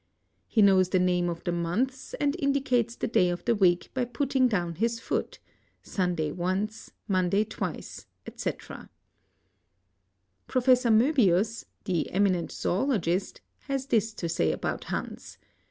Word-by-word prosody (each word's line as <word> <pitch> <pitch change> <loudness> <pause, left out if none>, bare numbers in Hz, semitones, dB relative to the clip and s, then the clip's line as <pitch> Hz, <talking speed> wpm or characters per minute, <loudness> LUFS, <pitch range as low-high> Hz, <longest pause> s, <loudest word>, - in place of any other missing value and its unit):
He 220 - +3
knotre 190 -2 +5
the 185 - +2
names 180 -1 +2
of. 170 -1 -5
the 175 - -1
months 210 +11 -2
and 290 +1 0
Indicates 255 -5 +1
the - - -2
day 180 -6 +3
of 175 0 -4
the - - +2
w,eek 180 -5 +2
by 255 -2 0
putting 255 +1 +1
dpwn 175 -6 -1
his 230 +1 0
foot. - - -3 0.5
Sun* 180 -3 -1
day 155 -2 -1
once, 190 +6 -3 0.2
Monday 185 +1 +2
twice. 220 - -6 0.3
&c. - - -1
Prof. - - -11 2.0
Moebius, 225 - +3 0.2
the 180 -5 -1
eminent 185 -3 +1
zoologist 190 -4 -1 0.3
has 275 -1 -2
this 225 -4 +1
to 170 - -3
say 160 - +1
about - - -3
Hans - - -6
200 Hz, 140 wpm, -27 LUFS, 175-240 Hz, 2.0 s, knotre